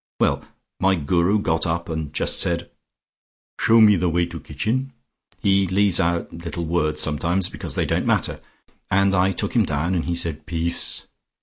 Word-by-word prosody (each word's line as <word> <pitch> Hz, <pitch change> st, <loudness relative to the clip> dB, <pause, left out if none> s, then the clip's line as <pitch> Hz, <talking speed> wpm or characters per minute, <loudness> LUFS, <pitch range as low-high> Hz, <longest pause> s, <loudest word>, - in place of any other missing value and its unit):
Well, -, -, +1 dB, 0.4 s
my 95 Hz, 0 st, +3 dB
Guru 85 Hz, +5 st, +1 dB
got 80 Hz, -4 st, 0 dB
up 85 Hz, +1 st, -2 dB
and 80 Hz, -3 st, -4 dB
just -, -, 0 dB
said, 85 Hz, 0 st, -1 dB, 0.9 s
'Show 115 Hz, +1 st, +5 dB
me 105 Hz, -2 st, +7 dB
the 90 Hz, +1 st, +1 dB
way 85 Hz, +1 st, +1 dB
to 85 Hz, 0 st, -8 dB
kitchen' 130 Hz, -, -3 dB, 0.4 s
he 95 Hz, -1 st, +2 dB
leaves 100 Hz, 0 st, +2 dB
out 85 Hz, 0 st, 0 dB
little 85 Hz, +1 st, -5 dB
words 80 Hz, -2 st, 0 dB
sometimes, 85 Hz, +5 st, +1 dB
because -, -, -6 dB
they -, -, 0 dB
don't -, -, -1 dB
matter -, -, 0 dB, 0.5 s
and 100 Hz, +1 st, +3 dB
I 95 Hz, +1 st, +3 dB
took 95 Hz, -, -3 dB
him -, -, +5 dB
down, 80 Hz, +6 st, -1 dB
and 85 Hz, -3 st, -1 dB
he 85 Hz, -, -1 dB
said 80 Hz, -3 st, -3 dB
'Peace!' 85 Hz, +1 st, 0 dB
85 Hz, 175 wpm, -22 LUFS, 85-95 Hz, 0.9 s, me